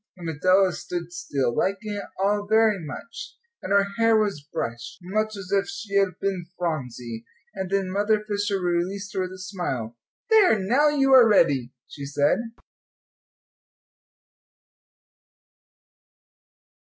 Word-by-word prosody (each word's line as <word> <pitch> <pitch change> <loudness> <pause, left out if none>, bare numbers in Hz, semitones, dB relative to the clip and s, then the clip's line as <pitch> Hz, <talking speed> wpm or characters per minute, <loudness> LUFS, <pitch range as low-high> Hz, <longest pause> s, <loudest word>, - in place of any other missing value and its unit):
And 175 -2 -7
Adela 185 +4 +3
stood 175 -1 -6
still, 135 -8 -2
liking 200 +2 -1
it 205 - -5
all 205 +1 +1
very 215 -3 +3
much; 230 - -8 0.2
and 185 - -6
her 200 0 +5 0.2
hair 225 -1 +5
was 205 -8 0
brushed, 115 -4 -5
much 215 +3 -2
as 190 -1 -9
if 200 -1 +2
she 220 - -7
had 195 -3 +2
been 190 -3 -2
Phronsie, 125 -9 -4 0.3
and 190 -1 -4
then 195 -1 0
Mother 210 +2 +1
Fisher 205 -1 -1
released 185 +3 -2
her 190 - -1
with 185 0 -4
a - - -9
smile. 175 - -4 0.4
"There, 410 - +6
now 240 +10 +3
you 270 -2 +3
are 245 -4 +8
ready," 135 - +3 0.2
she 140 -1 -8
said. 145 +5 +2
195 Hz, 130 wpm, -24 LUFS, 170-210 Hz, 0.4 s, are